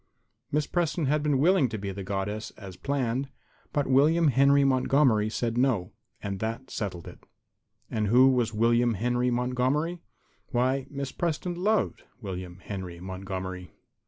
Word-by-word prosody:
Miss 150 0 +1
Preston 170 -1 0
had 150 +2 +2
been 145 -2 +2
willing 155 -2 +4
to 110 - -4
be 100 -1 -4
the 100 +1 -6
Goddess, 100 +2 -3
as 95 -3 -9
planned, 135 +1 -1 0.4
but 145 -1 0
William 150 +5 +4
Henry 140 +1 +5
Montgomery 130 -4 +3
said 115 +1 -1
no. 120 -9 +1 0.3
And 100 -1 -3
that 115 +5 -4
settled 90 -5 -4
it. - - -12 0.7
And 105 -1 0
who 125 +5 +6
was 120 -4 +1
William 115 +1 +2
Henry 125 +3 +1
Montgomery? 125 +7 0 0.5
Why, 130 +1 0
Miss 140 -2 -4
Preston 175 +1 -2
loved 205 +5 0 0.2
William 90 -4 -6
Henry 95 -4 -6
Montgomery. 95 -1 -6
125 Hz, 145 wpm, -27 LUFS, 100-140 Hz, 0.7 s, who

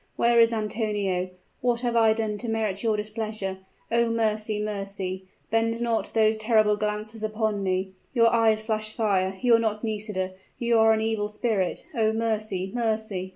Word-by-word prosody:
Where 235 0 +4
is 230 0 +6
Antonio? 210 -4 -1 0.3
What 240 -1 0
have 240 -1 -1
I 225 -1 +5
done 215 -2 -2
to 235 - -4
merit 215 -3 -1
your 220 -2 +1
displeasure? 215 -2 -4 0.3
Oh, 235 0 +3
mercy! 215 -2 0
mercy! 195 -3 -4 0.3
Bend 225 +1 +1
not 235 -1 0
those 220 0 +4
terrible 215 -1 +3
glances 215 +1 -3
upon 215 -1 -1
me! 190 0 -1 0.2
Your 230 -2 +4
eyes 220 -2 +3
flash 215 -1 -2
fire! 195 -4 0
You 245 -2 +3
are 230 - +6
not 215 -1 -1
Nisida 210 -4 -2 0.3
you 235 -1 +2
are 220 0 +6
an 220 0 +2
evil 220 -2 0
spirit! 210 -3 -1
Oh, 220 -1 +2
mercy! 215 -4 -1
mercy!" 220 -5 -2
215 Hz, 165 wpm, -26 LUFS, 210-225 Hz, 0.3 s, is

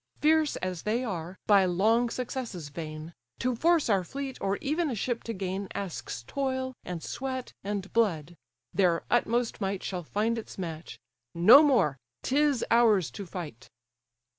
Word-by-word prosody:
Fierce 310 0 +3
as 185 -2 -4
they 230 +4 0
are, 180 -5 -5
by 200 -2 +6
long 215 +7 +2
successes 235 - -5
vain; 155 +1 -7 0.2
To 250 0 0
force 330 +5 +3
our 195 -4 +2
fleet, 270 +7 -5
or 195 0 0
even 310 +3 -1
a 250 - -2
ship 235 +3 -2
to 230 - -3
gain, 190 0 -3
Asks 170 -10 -5
toil, 260 - -2
and 175 -3 -6
sweat, 260 0 -4
and 200 -1 -4
blood: 175 -8 +1 0.4
their 175 -4 +2
utmost 240 -1 +1
might 195 -1 -2
Shall 180 -2 -3
find 215 +7 -1
its 220 - -10
match—No 165 - +3
more: 240 - +3 0.2
'tis 285 -1 +2
ours 220 -7 +4
to 200 -3 -7
fight." 150 -10 -8
205 Hz, 150 wpm, -28 LUFS, 175-250 Hz, 0.4 s, by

